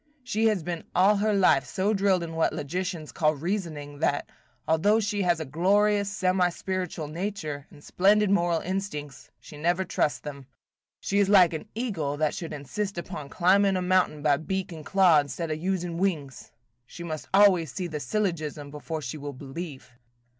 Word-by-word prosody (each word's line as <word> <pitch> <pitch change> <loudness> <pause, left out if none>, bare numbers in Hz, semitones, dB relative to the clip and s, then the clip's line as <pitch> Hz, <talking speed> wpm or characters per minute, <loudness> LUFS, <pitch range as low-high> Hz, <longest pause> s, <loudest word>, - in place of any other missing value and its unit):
She 225 -3 +1
has 210 -6 +1
been 170 0 -4
all 195 +4 +5
her 215 +2 +1
life 185 -9 +4
so 190 +11 -1
drilled 195 -3 +2
in 165 -1 -6
what 165 0 +1
logicians 175 +1 -4
call 155 -1 +1
reasoning, 155 -4 -4
that, 145 -2 0 0.4
although 200 +8 +3
she 205 -1 -1
has 175 -3 +2
a 160 - -4
glorious 200 +7 +2
semi 185 -2 +1
spiritual 180 -3 -4
nature, 155 -4 -5
and 145 - -17
splendid 205 +2 +3
moral 175 -4 +2
instincts, 175 -7 -5
she 150 - -12
never 175 +5 +1
trusts 165 -3 0
them. 140 -3 -9 0.5
She 200 - 0
is 200 -1 +3
like 185 -5 +6
an 160 +7 -6
eagle 175 - -2
that 155 0 +1
should 165 - -6
insist 190 +8 -4
upon 160 -5 -6
climbing 190 +3 +3
a - - -1
mountain 180 -5 +1
by 145 -2 +4
beak 190 +4 -3
and 160 -2 -8
claw 185 -3 +5
instead 145 +3 -3
of 155 - -2
using 175 -2 -2
wings. 155 -9 -2 0.4
She 170 - -9
must 155 -3 -5
always 190 -5 +5
see 185 - -4
the 155 -3 -4
syllogism 155 -7 -2
before 155 +1 -5
she 140 +4 -5
will 145 0 -6
believe." 140 +1 -8
175 Hz, 175 wpm, -27 LUFS, 150-195 Hz, 0.5 s, like